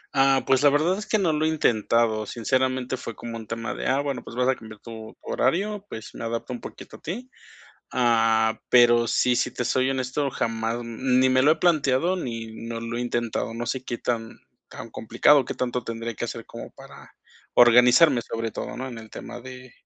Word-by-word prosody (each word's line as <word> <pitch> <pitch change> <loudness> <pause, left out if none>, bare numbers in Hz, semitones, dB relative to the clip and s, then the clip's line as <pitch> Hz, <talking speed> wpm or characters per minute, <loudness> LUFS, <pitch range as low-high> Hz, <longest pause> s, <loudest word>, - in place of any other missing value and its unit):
Ah, 135 0 +4
pues, 130 -1 +3
la 145 - +6
verdad 155 +6 +2
es 215 - -7
que 215 - +2
no 180 -6 +1
lo 155 +1 0
he - - +3
intentado, 115 -6 +1
sinceramente, 130 +1 -1
fue 115 -2 -7
como 115 0 -7
un 110 -1 -8
tema 115 +1 -4
de, - - -4
ah, 130 +2 +2
bueno, 140 -2 -3
pues, - - -10
vas 125 +1 +1
a 130 - +4
cambiar 110 -3 -12
tu 110 -1 -10
horario, 200 +9 -1
pues 110 - -8
me - - -8
adapto 115 +2 -3
un 120 - -7
poquito - - -10
a - - -27
ti. 240 +10 -6 0.6
Ah, 115 -2 +2
pero 120 -1 +5
sí, 125 +1 +2
si - - 0
te 125 - -3
soy 130 +2 +1
honesto, 130 +2 -1
jamás 115 +1 -2
ni 125 +2 +1
me 130 0 +3
lo 150 +3 +6
he - - -1
planteado 160 +1 +2
ni 115 -9 -4 0.2
no 115 0 -4
lo 115 +1 -4
he - - -2
intentado. 120 -2 -2
No 120 +1 -4
sé 130 +1 -3
qué 120 - -3
tan 115 -2 -4 0.3
tan 115 - -9
complicado, 130 +6 +3
qué - - -5
tanto 125 -1 -2
tendría 115 0 -5
que - - -4
hacer - - -6
como - - -9
para - - -15 0.4
organizarme, 125 +3 +6
sobre 115 -1 -4
todo, - - -6
¿no?, 130 +1 -5
en 120 -3 -8
el 110 -1 -12
tema 120 - -8
de 130 0 -11
125 Hz, 210 wpm, -25 LUFS, 115-135 Hz, 0.6 s, la